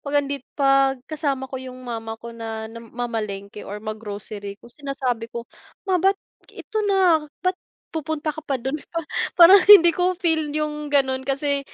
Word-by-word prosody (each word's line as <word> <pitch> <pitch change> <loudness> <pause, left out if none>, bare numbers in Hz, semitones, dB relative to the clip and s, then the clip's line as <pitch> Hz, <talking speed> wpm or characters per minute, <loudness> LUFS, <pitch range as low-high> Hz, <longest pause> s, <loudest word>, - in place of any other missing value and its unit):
'pag 285 0 -5
nandit 280 -1 0 0.2
'pag 275 -1 +4
kasama 285 -3 -2
ko 260 0 -6
yung 255 0 -9
mama 225 -2 -5
ko 235 +1 -10
na 225 -1 -6
nam 230 +1 -10
mamalengke 210 -4 -4
or 205 - -7
mag-grocery 210 -1 -6
ko 235 - -13
sinasabi 255 -5 -3
ko 235 0 -6 0.4
"Ma 370 -2 +1
bakit, 390 +2 +3 0.3
ito 435 - -4
na. 370 -5 +4 0.2
Bakit 365 0 0 0.3
pupunta 315 -1 -2
ka 315 - -8
pa 280 -3 -2
do'n" 260 +2 -4 0.2
Pa 335 - -3 0.4
parang 365 +3 +9
hindi 345 -5 +10
ko 360 +2 +1
feel 320 -4 0
yung 300 0 -3
gano'n 265 -2 +1
kasi 280 +1 0
275 Hz, 170 wpm, -23 LUFS, 230-315 Hz, 0.4 s, hindi